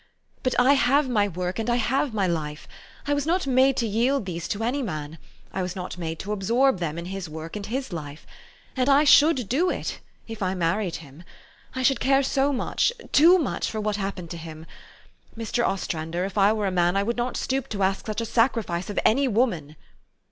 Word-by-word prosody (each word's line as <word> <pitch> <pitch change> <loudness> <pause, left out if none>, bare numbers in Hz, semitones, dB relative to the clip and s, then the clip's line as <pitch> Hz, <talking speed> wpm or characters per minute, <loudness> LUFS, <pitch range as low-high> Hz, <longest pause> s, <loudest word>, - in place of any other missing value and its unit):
But 255 - 0
I 255 +3 +6
have 275 +1 +3
my 210 -5 +2
work, 180 +1 -4
and 225 +1 -2
I 240 - +3
have 255 +3 0
my 205 -3 0
life. 155 -4 -3 0.4
I 290 - +1
was 285 +1 -1
not 360 +1 +1
made 265 0 +3
to 235 - +1
yield 235 +3 +1
these 170 -2 -4
to 210 +2 -3
any 255 +5 0
man. 155 - -5 0.3
I 190 - -2
was 180 0 -4
not 180 -1 -5
made 165 -1 -4
to 205 - -5
absorb 230 +4 +2
them 165 -2 -3
in 170 - -5
his 190 -2 -6
work 160 +3 -7
and 205 -1 -5
his 255 -3 -4
life. 150 -2 -7 0.5
And 260 +1 +1
I 280 +2 +6
should 290 -5 +5
do 325 - +1
it - - -4 0.3
if 225 -1 -8
I 185 0 0
married 180 +2 0
him. 140 +4 -15 0.5
I 260 - -2
should 265 -1 +3
care 270 +1 +3
so 275 +1 +1
much 265 - 0 0.2
too 340 +5 +7
much 315 -7 -2
for 220 - -4
what 210 -1 -1
happened 195 -4 -5
to 170 - -5
him.... 160 -1 -9 0.7
Mr. 230 +1 -1
Ostrander, 170 -3 -2
if 195 - -6
I 200 0 +4
were 215 -1 -1
a 195 - 0
man, 175 +1 +2
I 200 - +2
would 235 +3 -1
not 245 +1 -2
stoop 265 0 -2
to 200 -2 -2
ask 195 +3 0
such 215 +1 -2
a - - -2
sacrifice 225 -7 0
of 205 - -6
any 270 +5 +4
woman! 205 - 0
210 Hz, 215 wpm, -25 LUFS, 180-260 Hz, 0.7 s, too